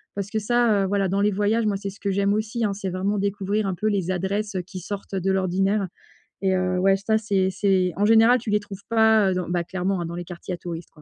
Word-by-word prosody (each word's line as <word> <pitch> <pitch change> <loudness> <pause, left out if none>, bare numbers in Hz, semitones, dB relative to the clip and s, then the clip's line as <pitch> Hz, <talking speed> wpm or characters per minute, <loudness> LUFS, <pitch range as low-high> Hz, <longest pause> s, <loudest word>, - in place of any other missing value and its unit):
Parce 200 0 -4
que 220 - 0
ça, 215 -2 +2
heu, - - -1
voilà, 200 0 +1
dans 195 +2 0
les 205 - +3
voyages, 210 +3 +1
moi, 200 -2 0
c'est 200 0 -5
ce 200 - -16
que 200 - -2
j'aime 200 +1 +1
aussi, 220 +2 -1
hein, 200 - 0
c'est 195 -1 -4
vraiment 195 +3 -1
découvrir 200 +1 -1
un 190 - -2
peu 210 - -5
les 195 -4 0
adresses, 195 +3 -2
heu, 185 - 0
qui 185 +1 -8
sortent 195 +3 -7
de 190 0 0
l'ordinaire. 190 +1 +1 0.6
Et 190 -1 +2
heu, 185 0 0
ouais, 195 +1 +4
ça, 215 +3 +1
c'est 200 -3 +1
c'est 185 -1 +1
en 205 - +2
général, 225 +3 +6
tu 220 -2 -5
les 210 - +3
trouves 200 -1 -10
pas, 220 -3 +4
heu, - - +1
dans 180 -1 -3
bah, 175 -1 0
clairement 180 0 -2
dans 165 - -6
les 175 0 -5
quartiers 175 +1 -7
à - - -4
touristes, 170 -1 -7
quoi. 150 - -19
195 Hz, 265 wpm, -24 LUFS, 185-210 Hz, 0.6 s, général